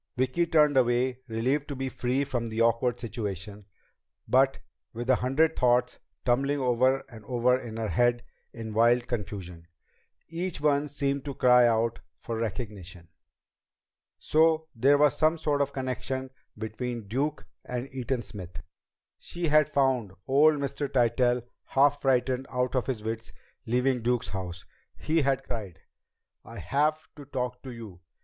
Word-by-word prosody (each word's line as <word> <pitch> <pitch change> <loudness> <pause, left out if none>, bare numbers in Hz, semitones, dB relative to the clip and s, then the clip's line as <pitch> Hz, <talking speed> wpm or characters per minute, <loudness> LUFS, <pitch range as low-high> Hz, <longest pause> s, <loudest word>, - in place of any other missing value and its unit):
Vicki 130 +7 +1
turned 150 -3 +4
away, 125 0 +2
relieved 130 +6 -1
to 140 - -5
be 135 0 -3
free 130 +1 -1
of 120 -4 -3
the 110 +1 -4
awkward 115 +1 +2
situation, 105 -3 -6 0.6
but 135 +1 +3 0.4
with 120 +1 -5
a 130 - +4
hundred 155 +6 +2
thoughts 125 0 +2 0.3
tumbling 135 +4 +1
over 130 +1 +2
and 110 -3 -13
over 125 +1 +2
in 120 -3 -6
her 110 -2 -2
head 120 0 +2 0.3
in 110 -2 -7
wild 120 +2 +4
confusion, 95 -7 -5 0.6
each 170 +1 -3
one 145 0 +2
seeming 140 -1 -1
to 140 0 -6
cry 125 -1 +6
out 115 0 +1 0.2
for 115 - -5
recognition. 100 -6 -6 1.1
So 160 0 +2
there 135 +5 +4
was 145 -2 +4
some 155 +1 +2
sort 150 -3 0
of 140 0 0
connection 130 0 -4 0.3
between 110 +1 -5
Duke 140 +8 -2 0.2
and 125 +1 -4
Eaton 130 -1 -2
Smith! 90 -7 -9 0.6
She 170 -2 -3
had 150 0 +4
found 130 -9 +1
old 150 +3 +5
Mr. 140 0 -3
Tytell 125 -1 +2 0.2
half 145 +1 +3
frightened 130 0 +1
out 125 0 -1
of 130 - 0
his 120 -5 -3
wits 115 +1 -5 0.3
leaving 125 +2 +1
Duke's 120 +1 0
house. 90 -3 -6 0.3
He 160 +1 +1
had 135 -1 +1
cried: 105 -9 -6 0.6
"I - - -11
have 155 +3 0
to 145 - -10
talk 125 -2 -4
to 130 - -9
you!" 110 -7 -10
125 Hz, 150 wpm, -28 LUFS, 115-140 Hz, 1.1 s, cry